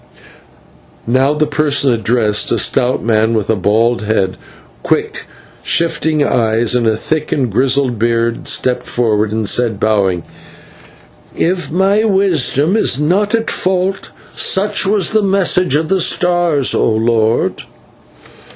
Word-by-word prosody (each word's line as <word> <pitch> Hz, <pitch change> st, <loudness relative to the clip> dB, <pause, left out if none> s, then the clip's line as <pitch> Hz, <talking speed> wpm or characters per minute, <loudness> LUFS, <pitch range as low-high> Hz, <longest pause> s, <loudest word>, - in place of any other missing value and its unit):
Now 130 Hz, +5 st, +1 dB
the 150 Hz, 0 st, +1 dB
person 145 Hz, -3 st, +1 dB
addressed, 110 Hz, -1 st, 0 dB
a -, -, +1 dB
stout 125 Hz, +1 st, 0 dB
man 110 Hz, 0 st, +1 dB
with 110 Hz, 0 st, -1 dB
a -, -, +1 dB
bald 110 Hz, +5 st, 0 dB
head, 105 Hz, -3 st, -1 dB, 0.5 s
quick, -, -, -2 dB, 0.3 s
shifting 160 Hz, -2 st, 0 dB
eyes, 115 Hz, -3 st, +1 dB
and 120 Hz, -2 st, +1 dB
a 110 Hz, -1 st, +1 dB
thick 155 Hz, +6 st, -3 dB
and 130 Hz, -5 st, -1 dB
grizzled 130 Hz, +1 st, 0 dB
beard, 115 Hz, 0 st, -1 dB
stepped 125 Hz, -1 st, 0 dB
forward 110 Hz, -3 st, -1 dB
and 110 Hz, -1 st, -2 dB
said, 115 Hz, -2 st, 0 dB
bowing, 95 Hz, -5 st, 0 dB, 1.1 s
"If 180 Hz, 0 st, -1 dB
my 195 Hz, +5 st, +1 dB
wisdom 190 Hz, -, +1 dB
is 140 Hz, -, +1 dB
not 195 Hz, +8 st, +1 dB
at 225 Hz, 0 st, -2 dB
fault, 185 Hz, +1 st, -1 dB, 0.3 s
such 200 Hz, 0 st, +1 dB
was 200 Hz, -2 st, +1 dB
the 220 Hz, -1 st, +2 dB
message 185 Hz, -5 st, +1 dB
of 155 Hz, +1 st, 0 dB
the 190 Hz, +1 st, +1 dB
stars, 175 Hz, -5 st, +1 dB
O -, -, +1 dB
lord." 110 Hz, 0 st, 0 dB
130 Hz, 135 wpm, -14 LUFS, 110-175 Hz, 1.1 s, the